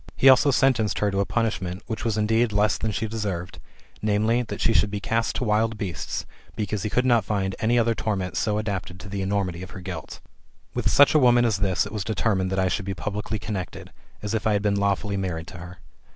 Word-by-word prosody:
He 135 - +7
also 130 +2 +6
sentenced 125 -7 +2
her 105 -1 +1
to 100 - -1
a 100 - +1
punishment 100 -5 -2
which 110 - -4
was 110 -2 0
indeed 110 +2 +2
less 105 -1 +2
than 110 - -2
she 105 +3 -2
deserved, 100 -5 -4 0.4
viz. 110 +3 +1
that - - -5
she 115 - +2
should 105 +1 +3
be 105 0 -3
cast 115 +3 -1
to - - -1
wild 110 0 +1
beasts, 85 -8 -4 0.3
because 105 -1 -2
he 105 - -2
could 125 +4 +1
not 120 -3 +4
find 95 -2 -1
any 115 +2 +2
other 115 0 +3
torment 95 -6 -2
so 105 +2 0
adapted 100 -4 -4
to 90 - -9
the 100 0 -3
enormity 95 -3 -1
of 95 - -8
her - - -9
guilt. 90 -4 -7 0.5
With - - 0
such 145 - +6
a 155 - +5
woman 120 -2 +5
as 110 -4 +1
this 95 -2 +1
it - - -8
was 105 -3 -3
determined 100 -3 0
that 95 - -1
I 95 0 +2
should 95 +2 -2
4>e 95 -2 -3
publicly 105 +2 -3
connected, 100 -3 -6 0.3
as 105 +1 -3
if 110 -1 0
I 110 - +3
had 100 0 0
been 105 -1 +2
lawfully 100 0 0
married 85 -4 -3
to - - -10
her. 90 +1 -10
105 Hz, 235 wpm, -25 LUFS, 95-110 Hz, 0.5 s, He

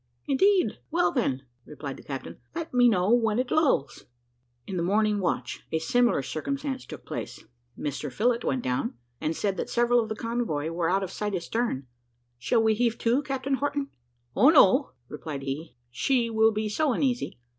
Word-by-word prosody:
"Indeed! 360 - +3
Well, 175 - +2
then," 135 -4 0 0.2
replied 145 -1 -7
the - - -12
captain, 135 -2 -7 0.2
"let 330 -3 -5
me 245 -1 +6
know 190 -1 +2
when 225 -3 +2
it 250 0 -1
lulls." 280 - +1 0.6
In 190 - -5
the 175 - 0
morning 210 +3 +2
watch 180 - -2
a 160 - +1
similar 235 - +2
circumstance 270 - -4
took - - -9
place. - - -6 0.3
Mr 145 -2 -4
Phillott, 235 +2 +1
went 130 -2 -1
down, 125 -2 -1 0.2
and 160 +1 -1
said 195 +1 -1
that - - -3
several 240 0 +3
of 220 - -5
the 220 - -2
convoy 225 -10 -2
were 165 0 0
out 195 +2 +2
of 190 - -5
sight 210 0 -2
astern. 180 - -2 0.5
"Shall 225 - +2
we 220 0 +4
heave 235 +1 +1
to, 240 +4 +2
Captain 275 -1 -3
Horton?" 285 0 -1 0.5
"O 270 - +6
no," 270 - +5
replied 150 -1 -6
he, 135 0 -5 0.2
"she 235 - +1
will 220 0 +4
be 215 0 -2
so 275 +6 +1
uneasy. 250 - -1
220 Hz, 175 wpm, -27 LUFS, 165-250 Hz, 0.6 s, me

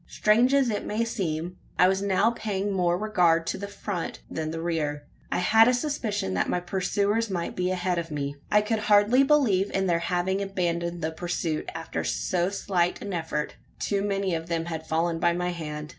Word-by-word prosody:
Strange 230 +5 +3
as 275 -4 +3
it 205 - -2
may 220 +2 -1
seem, 180 -5 -3 0.2
I 180 - +6
was 190 +1 +1
now 200 +3 +2
paying 205 -3 -2
more 175 -2 +2
regard 180 -5 +2
to - - -3
the 200 - -5
front 200 -3 -5
than 155 -1 -3
the 165 +1 -4
rear. 155 -3 -2 0.3
I - - +1
had 220 +5 +5
a 250 - +4
suspicion 235 - -2
that 90 - 0
my 180 - +1
pursuers 200 +5 0
might 175 -3 -3
be 180 0 0
ahead 180 -1 0
of 165 0 -5
me. 145 -2 -3 0.2
I 210 - +5
could 220 +1 0
hardly 210 +4 +4
believe 255 -10 +3
in 195 0 0
their 170 -2 +2
having 180 +3 0
abandoned 175 -3 -2
the 160 - 0
pursuit, 165 -1 -3
after 165 - -4
so 180 0 0
slight 180 -3 0
an 200 -1 -5
effort. 160 -3 -3 0.2
Too 200 -1 -1
many 195 -2 -1
of 165 0 -3
them 165 -1 -1
had 160 -2 -5
fallen 165 +1 0
by 170 +1 +3
my 180 +1 -1
hand. 150 -3 -5
180 Hz, 200 wpm, -26 LUFS, 170-205 Hz, 0.3 s, I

